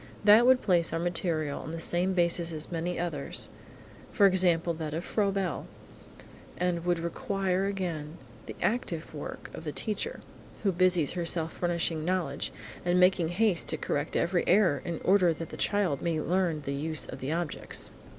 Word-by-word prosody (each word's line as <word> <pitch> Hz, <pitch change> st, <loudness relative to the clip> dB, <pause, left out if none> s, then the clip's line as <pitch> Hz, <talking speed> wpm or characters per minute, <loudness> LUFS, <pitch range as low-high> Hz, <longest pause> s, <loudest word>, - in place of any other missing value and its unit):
That 215 Hz, +4 st, +7 dB
would 255 Hz, 0 st, +5 dB
place 175 Hz, -4 st, +2 dB
our 165 Hz, -, -1 dB
material 165 Hz, -4 st, -1 dB
on -, -, -7 dB
the 165 Hz, -, -4 dB
same 175 Hz, +3 st, +1 dB
basis 170 Hz, -1 st, +1 dB
as 155 Hz, +2 st, -7 dB
many 175 Hz, +1 st, -2 dB
others, 165 Hz, -5 st, -1 dB, 0.6 s
for 200 Hz, -, +4 dB
example 180 Hz, -3 st, +3 dB
that 155 Hz, -2 st, -4 dB
of 170 Hz, -, -4 dB
Froebel, 195 Hz, -6 st, -1 dB, 0.9 s
and 175 Hz, -1 st, 0 dB
would 175 Hz, -1 st, +2 dB
require 185 Hz, +3 st, -1 dB
again 170 Hz, -5 st, -4 dB, 0.3 s
the -, -, -7 dB
active 180 Hz, -10 st, -2 dB
work 145 Hz, -, -7 dB
of -, -, -8 dB
the 150 Hz, -, -3 dB
teacher, 210 Hz, +6 st, -3 dB, 0.4 s
who 200 Hz, -, +3 dB
busies 180 Hz, -4 st, +3 dB
herself 165 Hz, -2 st, -1 dB
furnishing 170 Hz, -2 st, -1 dB
knowledge, 180 Hz, +1 st, -1 dB, 0.3 s
and 175 Hz, +1 st, +2 dB
making 180 Hz, -2 st, +4 dB
haste 180 Hz, +1 st, +1 dB
to -, -, 0 dB
correct 145 Hz, 0 st, -2 dB
every 175 Hz, +1 st, +1 dB
error 180 Hz, -10 st, +4 dB
in 170 Hz, -2 st, -4 dB
order 180 Hz, -3 st, +4 dB
that 165 Hz, +1 st, -7 dB
the -, -, -8 dB
child 195 Hz, -9 st, 0 dB
may 165 Hz, -2 st, 0 dB
learn 170 Hz, -1 st, 0 dB
the 140 Hz, 0 st, -4 dB
use 155 Hz, +2 st, -2 dB
of -, -, -8 dB
the 135 Hz, +3 st, -3 dB
objects. 170 Hz, -1 st, -2 dB
175 Hz, 170 wpm, -29 LUFS, 160-185 Hz, 0.9 s, That